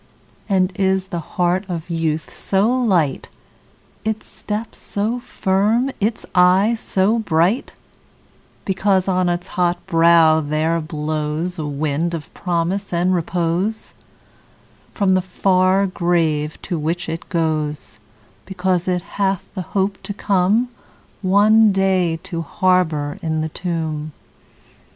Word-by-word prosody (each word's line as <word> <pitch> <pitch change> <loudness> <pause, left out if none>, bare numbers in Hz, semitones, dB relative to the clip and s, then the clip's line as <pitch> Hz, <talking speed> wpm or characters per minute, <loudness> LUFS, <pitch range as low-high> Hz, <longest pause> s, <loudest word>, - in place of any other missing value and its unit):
And 190 -1 +2
is 190 -1 +1
the 175 -3 -3
heart 180 +3 0
of 170 -1 -5
youth 160 -1 -2
so 195 +2 +1
light, 190 - +1 0.7
Its 220 0 -2
step 215 +2 -5
so 215 +4 -2
firm, 215 +4 +1
its 220 +3 -1
eye 185 +5 +5
so 205 +4 +1
bright, 185 - +1 0.9
Because 190 -1 +1
on 185 -1 +2
its 175 +1 -2
hot 175 -1 0
brow 165 -2 +5
there 155 +3 0
blows 155 +2 -3
A 150 - -3
wind 150 +4 -1
of 155 -3 -8
promise 180 +2 -2
and 175 +2 +1
repose 175 +4 -1 1.0
From 200 -3 0
the 185 0 +4
far 185 +1 +2
grave, 165 -5 0
to 175 - -3
which 170 +4 -2
it 165 +1 -5
goes; 155 -3 -2 0.5
Because 185 -1 -1
it 180 -1 0 0.2
hath 195 -1 0
the 190 - -4
hope 195 +2 -2
to 205 - -5
come, 205 +5 +2 0.5
One 210 +3 +5
day, 190 -3 +1
to 170 -3 -4
harbour 165 -4 0
in 160 -1 -1
the 160 - -2
tomb? 160 -3 -3
180 Hz, 125 wpm, -20 LUFS, 165-195 Hz, 1.0 s, eye